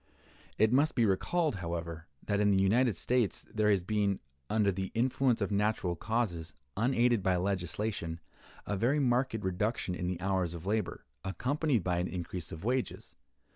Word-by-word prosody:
It 110 +2 +4
must 145 +4 +3
be 120 - +4
recalled, 150 - +1
however, 85 -2 -5 0.2
that 100 -1 +1
in 105 0 +4
the 95 -1 +4
United 115 +3 +3
States 120 +3 0
there 110 -1 +2
has 100 -4 +3
been, 100 0 +1 0.3
under 105 -2 +3
the 95 0 -3
influence 125 0 +2
of 100 - 0
natural 100 -3 +1
causes, 85 -8 -2 0.2
unaided 120 0 +3
by 95 0 +2
legislation, 90 -1 -2 0.5
a 105 - -1
very 120 +9 +2
marked 125 -2 +2
reduction 95 +1 -1
in 90 0 -3
the 90 -1 -2
hours 95 -3 0
of 85 +1 -8
labor, 105 -1 -1 0.2
accompanied 130 - 0
by 90 -1 0
an 90 - 0
increase 90 -2 -4
of 80 - -7
wages. 125 +3 -2
100 Hz, 165 wpm, -31 LUFS, 90-120 Hz, 0.5 s, It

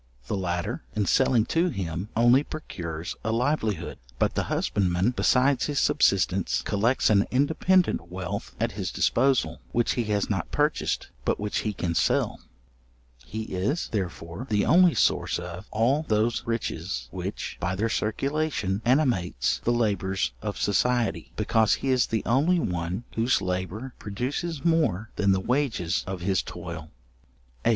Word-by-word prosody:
The - - -2
latter, 90 +3 -2
in 105 -1 +1
selling 120 +2 +3
to 170 +2 +3
him, 90 - -4
only 120 +4 +5
procures 85 - -6
a 110 - -1
livelihood; 115 - -1 0.2
but - - +1
the - - -1
husbandman, 95 +2 +1
besides 130 +1 +2
his 145 -1 -2
subsistence, 95 -6 +2
collects 110 +4 +2
an 100 -1 +4
independent 160 - +2
wealth 90 -1 -5
at - - 0
his - - -3
disposal, 135 -1 +1
which 120 0 +2
he 120 - -1
has 105 -2 0
not 95 -5 -2
purchased, 150 +1 0
but - - 0
which 105 0 -1
he 110 - -1
can 90 -4 -2
sell. - - +1 0.9
He 110 +1 -4
is, 105 - -2
therefore, 90 +2 -4
the 105 -2 +2
only 175 +1 +5
source - - +2
of 90 +2 -7
all 120 +7 +2
those 110 +2 +1
riches 110 - -3
which, - - -5
by 90 +2 -1
their 110 +4 0
circulation, 115 -2 -1
animates 125 - +1
the 120 - +2
labours 95 - 0
of - - -4
society: 120 +3 +1
because 110 0 +3
he 135 - -3
is 130 -3 +3
the 110 - -2
only 150 +9 +3
one 90 - -2
whose 115 +3 +2
labour 95 +7 -3
produces 135 - -3
more 115 - +1
than 100 -1 +3
the 95 - +3
wages 115 - 0
of 95 -1 -4
his 95 0 +1
toil. 85 -3 -7 0.7
§8. - - +3
110 Hz, 150 wpm, -26 LUFS, 95-130 Hz, 0.9 s, only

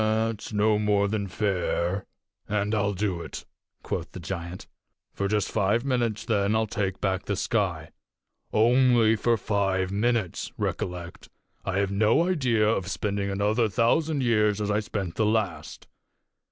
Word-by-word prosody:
"That's 110 0 -1
no 105 0 +2
more 105 -1 +2
than 100 -1 -2
fair, 95 -1 -1 0.4
and 105 0 0
I'll 100 -1 +1
do 95 -3 -1
it," - - -8 0.4
quoth - - -4
the - - -7
giant. 85 0 -6 0.5
"For 100 - -1
just 105 -1 0
five 110 +4 +1
minutes, 120 -5 0
then, 105 -2 +1
I'll 110 0 +2
take 100 -3 -2
back 95 -2 -1
the 100 - -1
sky. 95 -7 -1 0.6
Only 120 0 +4
for 115 +2 +2
five 95 -2 0
minutes, 110 -2 0
recollect. 90 -1 -4 0.3
I 95 0 -2
have 100 -1 +1
no 110 - +3
idea 125 -12 +2
of 95 -4 0
spending 100 +1 -2
another 105 +3 +1
thousand 140 +7 +1
years 105 -3 +2
as 105 0 -1
I 105 - +2
spent 100 -5 -4
the 110 - +2
last. 105 -5 -2
105 Hz, 150 wpm, -26 LUFS, 95-110 Hz, 0.6 s, Only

